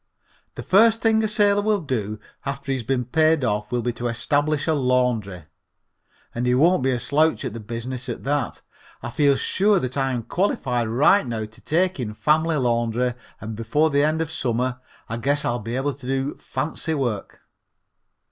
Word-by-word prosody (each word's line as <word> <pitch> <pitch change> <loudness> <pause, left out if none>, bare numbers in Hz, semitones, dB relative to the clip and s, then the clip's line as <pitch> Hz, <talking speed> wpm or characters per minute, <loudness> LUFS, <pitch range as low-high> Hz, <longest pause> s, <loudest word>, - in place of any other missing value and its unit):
The - - -6
first 225 +3 +5
thing 220 -1 +3
a - - +2
sailor 205 -1 +3
will 210 0 +1
do 110 - -3 0.2
after 140 0 -4
he - - +2
has - - -6
been 125 +1 -1
paid 155 +2 +2
off 105 -2 -1
will 120 -1 0
be 120 - -1
to 120 +1 -3
establish 145 +5 0
a 160 - +2
laundry, 125 - 0 0.9
and 120 +1 -2
he 125 - +3
won't 165 +5 +4
be 130 - +1
a 125 -2 0
slouch 155 +6 +1
at - - -4
the 115 - -6
business 120 +3 -6
at - - -5
that. 145 +2 -2 0.4
I 120 - -4
feel 145 -1 +3
sure 200 +7 +2
that 130 -1 -4
I 135 -1 +1
am 120 -2 -2
qualified 125 - 0
right 135 - +4
now 110 -2 -3
to 110 +2 -16
take 180 +1 0
in 105 -4 -4
family 155 +5 +2
laundry 120 -1 0 0.3
and 110 +1 -6
before 145 +8 +1
the 140 0 +3
end 155 +2 +1
of 160 - -8
summer 125 -4 -1 0.3
I 115 - -4
guess 145 +5 0
I'll 120 0 0
be 115 +2 -5
able 140 +2 -1
to 135 -2 -11
do 135 +1 -1
fancy 160 +1 -3
work. 120 -8 -3
130 Hz, 195 wpm, -23 LUFS, 120-155 Hz, 0.9 s, first